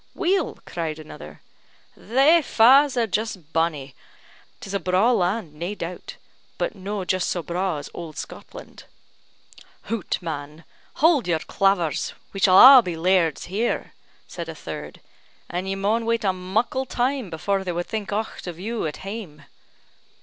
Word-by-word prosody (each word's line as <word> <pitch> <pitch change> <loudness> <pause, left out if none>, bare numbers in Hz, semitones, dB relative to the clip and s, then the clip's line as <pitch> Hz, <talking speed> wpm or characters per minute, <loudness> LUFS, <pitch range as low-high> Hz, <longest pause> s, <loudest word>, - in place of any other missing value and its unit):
"Weel," 375 -2 0
cried 160 -3 -4
another, 75 - -11 0.5
"thae 275 - +4
fa's 265 +2 +5
are 235 - +3
just 205 -6 -4
bonnie; 155 -5 -1 0.7
'tis 195 - -8
a 200 - 0
braw 185 +6 +2
land, 185 -5 0
nae 175 +7 -5
doubt; 175 -2 -7 0.4
but - - -1
no' 200 -1 -5
just 185 0 0
so 175 - -2
braw 180 0 -2
as 145 - -7
auld 165 -3 -8
Scotland." - - -10 1.0
"Hout 230 -4 -2
man! 155 -1 -6 0.4
hauld 315 - +4
your 170 -2 +2
clavers, 180 -1 0 0.2
we 195 - -5
shall 185 -1 +5
a' 260 +2 +11
be 180 -6 -4
lairds 170 -3 +2
here," 210 +6 -2 0.3
said - - -7
a - - -6
third; - - -8 0.5
"and 180 +2 -4
ye 195 - -1
maun 215 +4 0
wait 230 -1 +1
a 190 -2 +2
muckle 220 +8 -1
time 250 -3 -1
before 190 +4 -1
they 185 - -3
wad 175 0 -3
think 215 -2 -4
aucht 215 -2 -4
of 175 -1 -6
you 220 -1 -3
at 150 - -6
hame." 195 -8 -7
190 Hz, 155 wpm, -23 LUFS, 170-230 Hz, 1.0 s, a